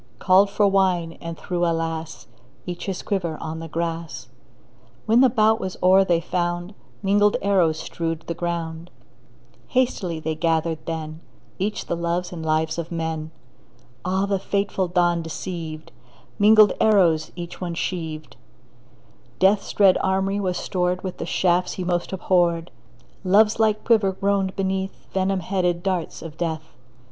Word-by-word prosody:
Called 190 +7 +4
for 205 0 +2
wine, 185 -4 +2
and 165 -1 -6
threw 175 -1 -2
— - - +2
alas! 165 -1 -3 0.2
— 130 +3 -31
Each 175 +1 -6
his 190 -2 -3
quiver 175 -6 -2
on 160 0 -5
the 165 - -6
grass. 165 -5 -4 0.8
When 230 +3 +4
the 265 - +6
bout 220 -1 +3
was 190 -3 -5
o'er 190 +1 +6
they 175 -3 +2
found 175 +2 -2 0.3
Mingled 205 +1 +3
arrows 180 -6 +3
strewed 165 -1 -4
the 170 - -3
ground. 170 0 -4 0.8
Hastily 205 -10 0
they 160 0 -2
gathered 160 0 0
then 160 -1 -4 0.4
Each 210 +3 -2
the - - -2
loves 170 +1 -2
and 165 -2 -6
lives 155 +1 0
of 170 0 -5
men. 160 -2 -3 0.7
Ah, 190 +2 0
the 200 -1 0
fateful 200 -1 -1
dawn 175 -1 +2
deceived! 165 -1 -6 0.5
Mingled 215 0 +7
arrows 175 -8 +3
each 175 0 -8
one 175 -2 -3
sheaved; 160 -3 -4 1.0
Death's 195 +5 +3
dread 195 -3 +5
armoury 195 +1 0
was 185 -3 -1
stored 180 0 -1
With 185 -2 -5
the - - -4
shafts 180 0 +1
he 185 - -4
most 175 -1 -1
abhorred; 175 -3 +1 0.5
Love's 210 +4 +4
light 215 -1 +2
quiver 210 -5 +3
groaned 195 0 0
beneath 190 0 -3
Venom 190 0 0
headed 180 -1 -1
darts 185 -4 -2
of 160 -1 -9
Death. 160 -2 -4
175 Hz, 150 wpm, -23 LUFS, 165-195 Hz, 1.0 s, Mingled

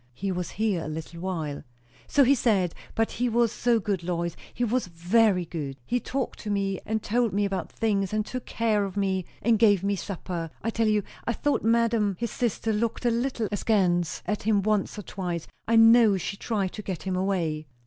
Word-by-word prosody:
"He 195 +6 -2
was 180 -1 -3
here 205 -6 +1
a - - -5
little 160 +2 -6
while." 160 -6 -3 0.5
"So 285 - +4
he 270 +2 +5
said. 200 -9 +2 0.2
But 225 0 +1
he 245 +1 0
was 235 -1 +2
so 235 -1 +2
good, 195 -3 -1
Lois! 170 -1 -2 0.2
He 245 - -3
was 240 -2 0
very 180 +2 +2
good. 145 -5 -5
He 245 - 0
talked 265 +1 -3
to 215 - -6
me, 195 -2 0
and 220 0 -1
told 235 -1 +1
me 205 +1 +2
about 190 -3 -3
things, 200 -4 0
and 215 0 0
took 255 +1 -6
care 220 -3 +1
of 195 0 -5
me, 190 -2 0 0.2
and 225 -1 +3
gave 205 -5 +5
me 200 0 +1
supper. 175 -3 -5
I 230 - 0
tell 225 0 +1
you, 210 -1 +2 0.2
I 235 - 0
thought 290 +6 0
madam 225 -3 +2
his 235 -1 -2
sister 225 -2 -1
looked 225 +3 -1
a 240 - +4
little 235 -1 -1
askance 185 -5 +1
at 210 +3 -1
him 205 -2 +2
once 210 -1 0
or 210 - -5
twice. 175 -3 -4 0.2
I 230 - +3
know 225 -2 +7
she 190 - -4
tried 200 -3 -2
to 210 - -6
get 190 -4 -5
him 190 -1 -2
away." 170 -5 -1
205 Hz, 210 wpm, -26 LUFS, 180-225 Hz, 0.5 s, know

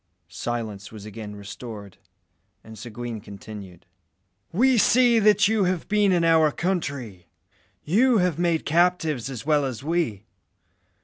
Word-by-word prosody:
Silence 110 -4 -5
was 105 -2 -10
again 110 -1 -8
restored, 100 0 -9 0.7
and 110 0 -12
Seguin 115 0 -7
continued 100 -3 -11 0.7
"We 255 +8 +3
see 240 +1 +4
that 210 -1 +4
you 215 -2 +2
have 180 -2 -1
been 205 -1 +3
in 175 -2 +2
our 160 -2 +4
country. 140 - -3 0.6
You 230 +9 +3
have 180 -4 +1
made 170 -2 +1
captives 160 -6 +1
as 130 -2 -7
well 150 -1 +3
as 130 -2 -4
we. 145 - -1
145 Hz, 130 wpm, -24 LUFS, 110-180 Hz, 0.7 s, see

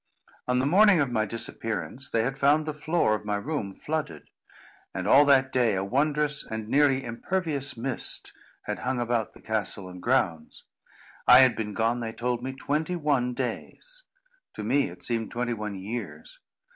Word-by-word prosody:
On 125 0 +1
the 130 - +1
morning 195 +4 +5
of 140 -4 +1
my 110 -2 0
disappearance, 115 - -4
they 115 - +1
had 135 +3 -2
found 150 +2 +3
the 155 - -3
floor 155 -5 +1
of 105 - -2
my 105 0 -1
room 105 -2 -3
flooded; 145 - -5 0.6
and, - - -3
all 145 +2 +7
that 135 -2 +4
day, 120 -5 +2
a 95 - -1
wondrous 150 +6 +1
and 110 -1 -6
nearly 135 +1 +3
impervious 140 +3 -1
mist 125 +2 -4 0.3
had - - -4
hung 130 0 -2
about 120 -2 -1
the - - -16
castle 105 -3 -2
and 90 0 -10
grounds. 95 -11 -1 0.6
I 125 +1 +9
had 130 -2 +5
been 105 -2 -4
gone, 115 +2 +1
they 115 -1 -4
told 120 0 -2
me, 130 +1 -4
twenty 150 +6 -2
one 140 -6 0
days. - - -5 0.5
To - - -5
me 140 0 +1
it - - -13
seemed 115 -2 -2
twenty 120 0 -2
one 105 -2 -5
years. 115 - -7
125 Hz, 175 wpm, -27 LUFS, 110-145 Hz, 0.6 s, I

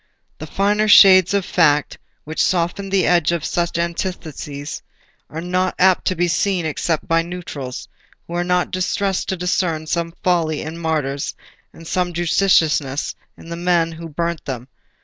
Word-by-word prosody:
The 155 - -7
finer 205 +5 +1
shades 190 -3 +8
of 200 -2 0
fact 150 -4 +2 0.2
which 155 +1 -1
soften 185 +2 0
the 195 -1 +2
edge 170 -2 +3
of 170 -3 -2
such 170 -1 -1
antitheses 160 -4 -4 0.5
are 160 - -6
not 180 +1 -1
apt 185 0 +3
to 185 - +1
be 175 +1 +1
seen 180 0 0
except 160 +1 -2
by 165 0 +3
neutrals, 165 -7 -7 0.4
who 170 - -9
are 175 0 0
not 180 0 0
distressed 190 +1 -1
to 190 - -1
discern 175 -3 -1
some 170 +1 -2
folly 165 -4 +1
in 160 +2 -7
martyrs 150 -4 -2 0.4
and 165 - -14
some 180 0 -1
judiciousness 160 -5 +1 0.2
in 165 - -13
the 170 - -4
men 170 -1 +1
who 165 0 -8
burnt 170 +2 -3
them. 130 -1 -6
170 Hz, 160 wpm, -20 LUFS, 160-180 Hz, 0.5 s, shades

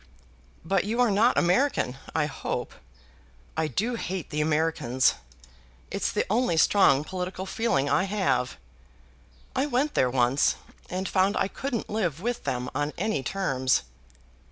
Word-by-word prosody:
"But 190 +2 +2
you 225 +4 -2
are 245 -3 +4
not 220 +5 +3
American, 180 - +2 0.2
I 160 -2 +2
hope. 150 - -4 0.8
I 160 - 0
do 225 +10 -1
hate 190 -6 -4
the 150 0 0
Americans. 150 -5 +2 0.8
It's - - -1
the - - 0
only 220 -5 +1
strong 150 -5 +5
political 185 +2 -4
feeling 190 -10 0
I 145 +7 +2
have. 185 - 0 1.0
I 265 +3 +1
went 285 +3 0
there 125 - +3
once, 125 +2 +2 0.3
and 185 +1 -3
found 195 +1 +2
I - - +2
couldn't 250 +2 -4
live 175 -8 -1
with 240 +5 -3
them 125 0 -2
on 145 +2 -1
any 195 -6 0
terms." 130 -5 0
185 Hz, 140 wpm, -27 LUFS, 145-215 Hz, 1.0 s, strong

